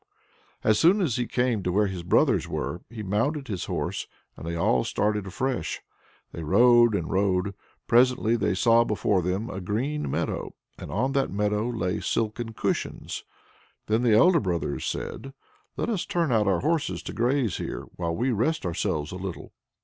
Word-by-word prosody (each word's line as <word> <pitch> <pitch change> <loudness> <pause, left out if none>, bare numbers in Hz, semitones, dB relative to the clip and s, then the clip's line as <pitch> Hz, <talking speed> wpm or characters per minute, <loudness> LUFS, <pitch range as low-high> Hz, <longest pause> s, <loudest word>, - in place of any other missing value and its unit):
As 110 -1 +3
soon 180 +6 +5
as 160 - 0
he 120 -1 -1
came 125 -4 0
to 90 - -1
where 105 +3 +3
his 95 -3 -4
brothers 85 - +2
were, - - -3
he 115 -2 -7
mounted 135 +9 -1
his 95 -5 -3
horse, - - -3 0.3
and 80 - -9
they 85 - -2
all 65 -7 +2
started 105 -1 -1
afresh. 130 -2 -2 0.5
They 85 - -7
rode 120 +7 +5
and 85 -5 -2
rode; 95 0 +1 0.3
presently 120 -1 +4
they 110 - 0
saw 115 +3 +5
before 105 -3 +1
them 95 +6 -2
a 95 - -5
green 130 +11 -2
meadow, - - -3 0.2
and - - -8
on 125 +8 0
that 135 -1 +1
meadow 105 +3 0
lay 90 -7 -1
silken 115 +1 -2
cushions. - - -3 0.6
Then 110 +2 +1
the 115 -3 +4
elder 175 +7 +6
brothers 85 - -2
said, 135 0 -5 0.4
"Let's 215 -6 -1
turn 170 -5 0
out 110 -3 +3
our 95 -3 +2
horses 160 +1 0
to - - -6
graze 120 -2 +1
here, - - -5
while 85 -1 -2
we 125 +6 0
rest 125 +7 0
ourselves 75 -3 -1
a 90 - -5
little." 95 -1 -7
110 Hz, 170 wpm, -26 LUFS, 95-125 Hz, 0.6 s, elder